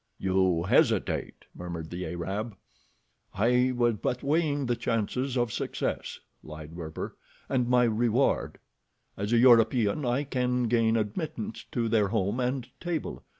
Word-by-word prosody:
"You 95 -3 +1
hesitate," 95 - +1
murmured 85 -2 -7
the 90 +1 -4
Arab. 95 +5 -4 0.8
"I 125 +5 +3
was 120 -2 +2
but 125 - -2
weighing 145 -1 +1
the 120 -1 0
chances 125 +4 -1
of 120 -3 0
success," - - -3 0.2
lied 75 0 -10
Werper, 80 -2 -6 0.3
"and 125 -3 0
my 125 0 +5
reward. 120 +3 +1 0.6
As 100 +2 -3
a 120 - +4
European 120 0 +4
I 125 +3 +1
can 125 -2 0
gain 115 -1 +2
admittance 155 - -4
to 120 -2 0
their 110 -2 +2
home 100 +2 -1
and 125 0 -1
table. 175 -3 -4
120 Hz, 135 wpm, -28 LUFS, 100-125 Hz, 0.8 s, my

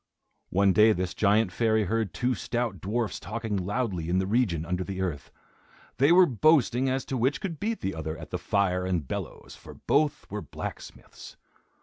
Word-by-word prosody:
One 95 +1 +3
day 110 +2 +6
this 90 -1 -3
giant 105 -1 +2
fairy 110 +1 +2
heard 110 0 -1
two 125 +1 0
stout 120 -4 -3
dwarfs 110 +3 -2
talking 110 +4 -4
loudly 95 -3 -2
in 90 - +2
the 95 - +1
region 95 -7 +1
under 90 +2 -2
the 95 0 -6
earth. 85 -7 -3 0.7
They 140 +6 +4
were 180 +1 +7
boasting 130 - +3
as 130 +1 -1
to 130 - -3
which 130 +6 +1
could 165 -6 -5
beat 225 +1 -2
the 95 - -2
other 80 0 -5
at - - -10
the - - -2
fire 95 -2 0
and 90 -6 -1
bellows, - - -6
for - - -13
both 150 0 0
were - - -3
blacksmiths. - - -9
105 Hz, 185 wpm, -27 LUFS, 90-125 Hz, 0.7 s, were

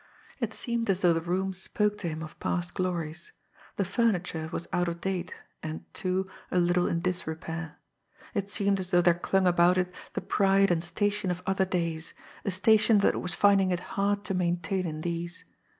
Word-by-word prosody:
It - - -1
seemed 235 -3 -2
as 190 -1 +2
though 175 -2 +5
the 165 - 0
room 185 +3 -1
spoke 210 +3 -1
to 180 - -3
him 160 0 -5
of 155 - -10
past 175 -1 -2
glories. 175 - -3 0.4
The 200 - 0
furniture 180 -8 0
was 170 - -4
out 175 0 +2
of 170 0 -3
date, 185 -1 -2 0.3
and, 155 0 -5
too, 185 +1 -1 0.2
a - - 0
little 175 0 +3
in 170 - 0
disrepair. 165 -2 -4 0.6
It 200 -3 -2
seemed 200 -1 +1
as 185 -1 -3
though 175 -1 +5
there 175 0 +6
clung 185 +2 +1
about 175 0 +5
it 180 0 0 0.2
the - - -2
pride 195 -1 +3
and 165 -1 +1
station 205 +3 0
of 180 0 -3
other 190 0 +2
days, 170 -3 -2 0.3
a - - -1
station 215 +3 +5
that - - +4
it - - -2
was 180 - -2
finding 200 -2 +4
it 180 -1 0
hard 200 0 +1
to 195 - -3
maintain 180 +1 0
in 155 -1 -5
these. 170 +1 -4
180 Hz, 195 wpm, -28 LUFS, 170-195 Hz, 0.6 s, there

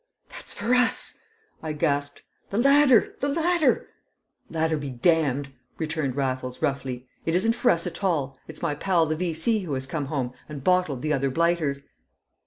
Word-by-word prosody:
"That's - - -9
for 240 - 0
us!" 250 -2 +2 0.4
I 155 -1 -3
gasped. 145 -1 -1 0.3
"The 200 - -3
ladder! 275 -1 +5
The 285 - 0
ladder!" 330 -2 +2 0.6
"Ladder 160 -1 0
be 145 -1 -5
damned!" 140 0 +1 0.3
returned 155 -5 -2
Raffles, 130 -2 -2
roughly. 130 -2 -2 0.2
"It 165 - 0
isn't 225 +5 +3
for 245 +1 +2
us 170 0 +2
at 180 +3 -6
all; 145 -8 0
it's 160 +1 -9
my 165 -3 +1
pal 170 +2 +2
the 155 0 -1
V.C. 175 +6 0
who 175 -7 -4
has 130 0 -2
come 145 0 -3
home 130 -4 -2 0.2
and 145 -3 -7
bottled 180 -8 +2
the 155 0 +1
other 135 -1 +1
blighters." 160 -2 0
160 Hz, 170 wpm, -25 LUFS, 140-185 Hz, 0.6 s, ladder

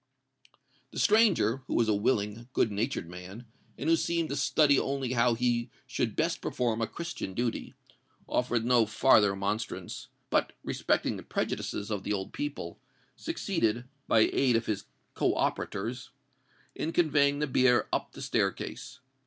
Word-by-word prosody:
The - - -10
stranger, 210 - +4
who - - -2
was 115 - +3
a 110 - +3
willing, 105 +2 0
good 110 - +2
natured 105 -2 -2
man, 90 +7 -9 0.3
and 145 - -4
who 165 - +6
seemed 165 0 0
to 140 - -2
study 145 0 +4
only 135 -2 -2
how 120 -1 +3
he 120 0 0 0.2
should - - -2
best - - 0
perform 115 -2 -1
a 115 - +1
Christian 170 - -6
duty, 120 -1 -2 0.5
offered 120 -2 0
no 120 -3 +4
farther 110 -1 +5
remonstrance; 100 +3 -3 0.2
but, - - +2
respecting - - 0
the - - -7
prejudices 105 +2 -3
of 105 -2 -1
the 105 - -2
old 95 -1 -4
people, 295 +1 -5 0.4
succeeded, 165 - -1 0.2
by 110 - +5
the - - +3
aid 130 -3 +3
of 115 0 +1
his 100 -2 -2 0.3
co - - +1
operators, 115 +5 -2 0.6
in 160 - -3
conveying 145 -4 +3
the 150 - 0
bier 130 -3 +3
up - - -1
the - - -8
staircase. 130 0 -2
120 Hz, 155 wpm, -29 LUFS, 110-140 Hz, 0.6 s, who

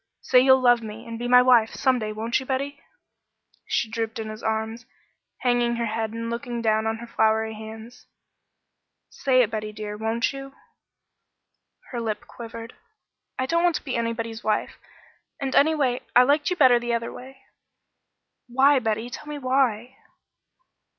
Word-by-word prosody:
Say 255 - +4
you'll 260 +1 +6
love 245 -1 +5
me 220 0 -8
and 230 0 -6
be 240 - -3
my 250 0 +7
wife 240 -3 +4
some 260 -1 +2
day 215 -1 -3
won't 225 +3 -1
you, 265 - -8
Betty?" 280 +2 -3 0.9
She - - 0
drooped 225 0 -4
in 220 -1 -5
his 215 0 -8
arms, 220 +1 -3 0.5
hanging 240 -1 +2
her 235 0 -1
head 220 0 -2
and 230 +1 -5
looking 235 +1 -4
down 220 -1 +1
on 220 0 -1
her 235 - -8
floury 220 -1 +1
hands. 220 +2 -11 1.0
"Say 255 -2 +3
it, 225 - -3
Betty 215 -1 -4
dear, 210 -1 -6
won't 225 +3 -1
you?" 275 0 -8 1.4
Her 240 -2 -3
lip 215 -2 -3
quivered. 230 0 -9 0.6
"I 260 - 0
don't 335 +5 +1
want 350 -2 +3
to - - -3
be 265 - -3
anybody's 230 -1 -3
wife 215 -1 -1 0.6
and, 270 -1 -3
anyway 280 -5 +3
I 250 - +8
liked 290 +3 +2
you 360 - 0
better 255 -7 +5
the 240 0 -1
other 230 0 -4
way." 265 +1 -11 1.1
"Why, 270 +3 +4
Betty? 225 0 -2
Tell 300 - -8
me 300 0 -5
why." 255 -2 0
235 Hz, 165 wpm, -24 LUFS, 220-260 Hz, 1.4 s, I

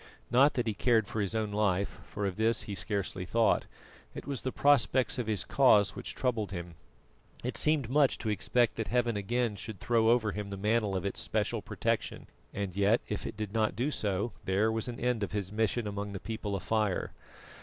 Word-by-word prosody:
Not 135 +4 +5
that 120 - 0
he 110 - 0
cared 110 0 +2
for 110 - -2
his 100 +2 -2
own 110 -2 -1
life, 100 -2 0
for 105 - -3
of 95 -2 -2
this 110 0 +2
he 105 - -6
scarcely 100 -2 -2
thought; 115 +5 +2 0.5
it - - -7
was 140 -3 -4
the 130 - -2
prospects 130 -3 +3
of 120 - -2
his 105 -5 0
cause 105 -7 +4
which - - -6
troubled 115 -6 -1
him. 85 -2 -6 0.7
It 125 - -3
seemed 150 -5 +3
much 140 +2 +3
to 110 - -3
expect 115 +3 +1
that 110 - -2
Heaven 120 -2 +1
again 115 +2 -1
should 100 0 -7
throw 115 +1 +2
over 115 -3 +3
him 105 0 -5
the 100 - -5
mantle 105 0 +1
of 95 - -4
its 100 - -2
especial - - -1
protection, - - -2 0.3
and 100 -3 -4
yet 100 +4 +3
if 105 - -3
it - - -7
did 105 -2 -4
not 110 -3 +1
do 125 +8 0
so 105 -2 -1
there 100 +4 +2
was 110 +1 -2
an 120 -1 -6
end 125 -2 0
of 100 - -3
his 100 -2 -2
mission 110 +2 0
among 100 0 -4
the 100 - -5
People 110 -2 -4
of 95 - -5
Fire. 110 -4 0
110 Hz, 210 wpm, -30 LUFS, 100-120 Hz, 0.7 s, Not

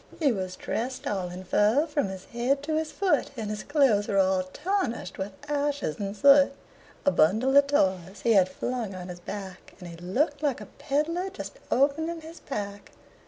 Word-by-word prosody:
He 295 -5 +3
was 185 -4 -3
dressed 250 +2 -4
all 190 -3 -2
in 180 +1 -8
fur 215 - +3
from 295 -7 -1
his 190 -1 -7
head 255 +4 -1
to 310 +1 -1
his 315 0 -1
foot, 390 -3 +1
And 215 -2 -3
his 210 0 -4
clothes 270 -9 +3
were 200 - 0
all 190 -1 +3
tarnished 370 - -2
with 190 +2 -3 0.2
ashes 285 - -1
and 200 0 -4
soot; 280 +3 +6 0.5
A 285 - +5
bundle 220 - +3
of 280 0 +7
toys 190 - 0
he 230 - +4
had 185 -3 +5
flung 235 -3 -3
on 180 0 -7
his 175 0 -7
back, 190 0 -8
And 180 - -9
he 170 -1 -9
looked 275 - -1
like 285 -5 0
a 210 - -8
pedler 330 +6 0
just 385 - -8
opening 320 +5 +1
his 325 +2 -11
pack. 205 -6 -6
235 Hz, 190 wpm, -27 LUFS, 190-290 Hz, 0.5 s, of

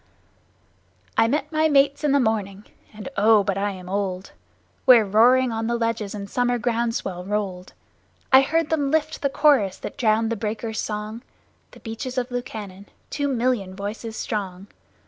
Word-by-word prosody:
I 225 - +4
met 295 +8 -1
my 315 0 +2
mates 280 0 +3
in 295 - +2
the 280 - +4
morning 210 -4 -1 0.3
(and, 210 +2 -9
oh, 210 0 +5
but 195 -1 -1
I 200 +1 -1
am 185 -2 -8
old!) 190 -1 -3 0.5
Where 240 -4 +7
roaring 240 +5 +4
on 225 0 -2
the 235 - 0
ledges 230 -3 -2
the 205 -1 -5
summer 245 +3 0
ground 235 -1 -1
swell 180 -5 -4
rolled; 190 -2 -4 0.6
I 265 - +9
heard 325 +3 0
them 290 -3 +1
lift 310 +1 -1
the 280 - +1
chorus 270 -10 +3
that - - -8
drowned 225 -1 +2
the - - 0
breakers' 220 +1 -4
song 215 +2 -4 0.5
The - - -17
Beaches 240 +3 -6
of 250 0 -2
Lukannon 205 -5 -6 0.2
two 285 -1 -1
million 240 -7 -1
voices 215 +3 -6
strong. 195 -3 -4
225 Hz, 165 wpm, -23 LUFS, 200-255 Hz, 0.6 s, I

